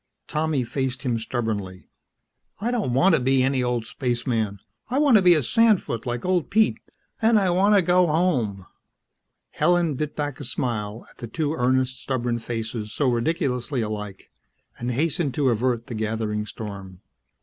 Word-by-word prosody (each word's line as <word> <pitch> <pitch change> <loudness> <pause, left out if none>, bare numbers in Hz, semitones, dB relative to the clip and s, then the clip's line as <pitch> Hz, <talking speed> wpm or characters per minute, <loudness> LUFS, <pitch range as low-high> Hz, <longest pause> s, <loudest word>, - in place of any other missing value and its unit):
Tommy 150 -3 0
faced 130 +2 -3
him 120 -4 0
stubbornly. 110 -6 -4 0.7
"I 230 +5 -1
don't 210 - -1
want 185 +8 +5
to - - +4
be 130 +1 +3
any 135 0 +1
old 125 -2 -1
spaceman. 115 -4 -2 0.3
I 255 - 0
want 285 -4 +5
to - - +4
be 180 -2 +6
a 155 - +2
sandfoot 210 - +2
like 120 +3 -3
old 180 -3 +1
Pete. 220 +1 +2 0.4
And 225 0 +5
I 190 -3 +2
want 200 +4 +4
to 195 - +4
go 180 +1 +4
home." 130 - 0 0.9
Helen 175 -3 +2
bit 150 +2 -4
back 145 -2 -3
a - - -6
smile 115 -4 -3
at - - -21
the 120 - -6
two 150 +5 -2
earnest, 130 -2 0
stubborn 120 -3 -1
faces 115 -2 -4
so 140 +2 +1
ridiculously 125 0 -1
alike, 105 -3 -6 0.5
and 120 - -3
hastened 145 +1 0
to 140 -3 +2
avert 120 0 0
the 130 - -7
gathering 110 -1 -2
storm. 95 -5 -8
130 Hz, 165 wpm, -24 LUFS, 115-160 Hz, 0.9 s, be